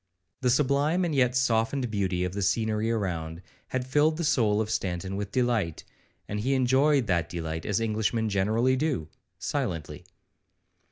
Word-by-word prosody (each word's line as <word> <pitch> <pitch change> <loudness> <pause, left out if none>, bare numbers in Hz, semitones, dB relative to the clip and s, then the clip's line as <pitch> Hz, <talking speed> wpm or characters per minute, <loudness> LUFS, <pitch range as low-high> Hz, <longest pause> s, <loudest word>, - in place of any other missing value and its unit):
The 130 -2 +1
sublime 145 +7 +2
and 165 - -1
yet 125 -3 +2
softened 120 0 +1
beauty 95 -3 0
of 90 0 -2
the 100 - -3
scenery 110 +2 0
around, 90 -6 -3 0.2
had 130 -1 -2
filled 150 +4 +2
the 170 - -2
soul 110 -8 +2
of 110 0 -1
Stanton 95 -2 -2
with 100 0 -4
delight, 115 -10 0 0.4
and 105 - -3
he 130 +6 +1
enjoyed 135 +1 +3
that 85 -5 0
delight 80 -2 -4
as 105 0 +1
Englishmen 110 0 0
generally 110 +6 +2
do, 130 - -1 0.3
silently. 95 - -3
110 Hz, 155 wpm, -27 LUFS, 95-130 Hz, 0.4 s, enjoyed